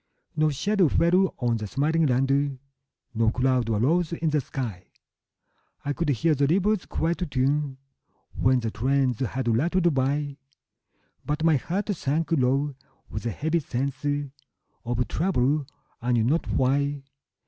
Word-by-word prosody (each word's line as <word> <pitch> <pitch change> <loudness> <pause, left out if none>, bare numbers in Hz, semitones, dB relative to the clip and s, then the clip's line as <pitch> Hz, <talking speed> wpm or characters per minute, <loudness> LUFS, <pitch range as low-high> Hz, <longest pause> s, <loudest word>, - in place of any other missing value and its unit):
No 155 0 +3
shadow 195 +6 +2
fell 180 +5 +3
on 120 -2 0
the 105 -1 -5
smiling 150 +7 +1
land, 135 +2 +1 0.6
No 115 0 +2
cloud 125 -1 +1
arose 155 +11 +1
in 165 -1 -1
the 150 -1 +2
sky; 115 -9 -5 1.0
I 145 - 0
could 165 +1 -2
hear 155 +4 +2
the 140 -1 +2
river's 195 +5 +1
quiet 170 +1 -1
tune 140 +1 0 0.6
When 130 0 +2
the 115 -1 -2
trains 130 0 +1
had 130 -1 -2
rattled 170 +5 +2
by; 140 +1 -1 0.9
But 150 +2 -2
my 160 -3 +4
heart 190 - -3
sank 155 +2 -1
low 140 0 +2 0.4
with 110 +3 -4
a - - +1
heavy 155 - 0
sense 135 -1 -3 0.8
Of 120 0 -1
trouble, 150 - +1 0.3
I 125 +1 0
knew 115 -2 +3
not 150 +9 +1
why. 140 +2 +1
140 Hz, 140 wpm, -26 LUFS, 125-160 Hz, 1.0 s, my